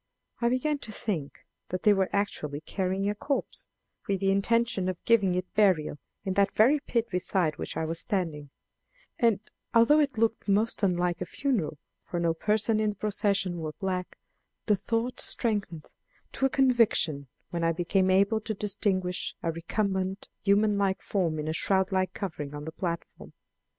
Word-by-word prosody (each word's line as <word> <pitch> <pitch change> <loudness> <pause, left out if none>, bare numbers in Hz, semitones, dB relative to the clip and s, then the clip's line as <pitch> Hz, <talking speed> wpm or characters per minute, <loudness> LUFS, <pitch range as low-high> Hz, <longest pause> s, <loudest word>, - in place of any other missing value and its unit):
I 235 - +3
began 285 +4 0
to 225 - -8
think 165 - -4 0.2
that 185 - -3
they 210 - +6
were 190 -1 +1
actually 150 -8 -2
carrying 190 +3 -2
a 205 - +1
corpse, 275 +7 -3 0.4
with 195 -1 0
the 195 0 +2
intention 200 -1 +1
of 185 - -3
giving 200 -6 +4
it 180 0 -3
burial 185 -8 +2 0.3
in 190 - 0
that 200 +1 +3
very 260 +8 +5
pit 235 -5 -1
beside 180 -3 0
which - - -4
I 160 - 0
was 165 +1 -2
standing; 165 - -2 0.7
and, 230 -5 +3 0.3
although 235 +7 +6
it 280 -5 +1
looked 225 0 0
most 210 +3 +2
unlike 180 -3 +1
a 180 - -3
funeral, 230 - -1 0.3
for 175 - -4
no 170 -1 +2
person 215 +5 +1
in 215 -1 +2
the 205 - -4
procession 200 -3 0
wore 155 -1 -4
black, 185 -2 -3 0.5
the 210 - +4
thought 230 +5 -2
strengthened 205 -9 -1 0.4
to 270 - +1
a - - -6
conviction 230 - +2 0.2
when 170 -1 -2
I 165 - +3
became 185 +3 +1
able 200 +4 +3
to 220 0 -4
distinguish 190 -3 0
a 165 - +1
recumbent, 190 +3 -2
human 205 0 +3
like 195 -1 0
form 170 -6 0
in 150 0 -3
a 155 - -1
shroud 190 +3 +1
like 185 -1 0
covering 150 -7 -5
on 145 0 -6
the 160 - -5
platform. 170 0 -5
195 Hz, 170 wpm, -28 LUFS, 175-215 Hz, 0.7 s, they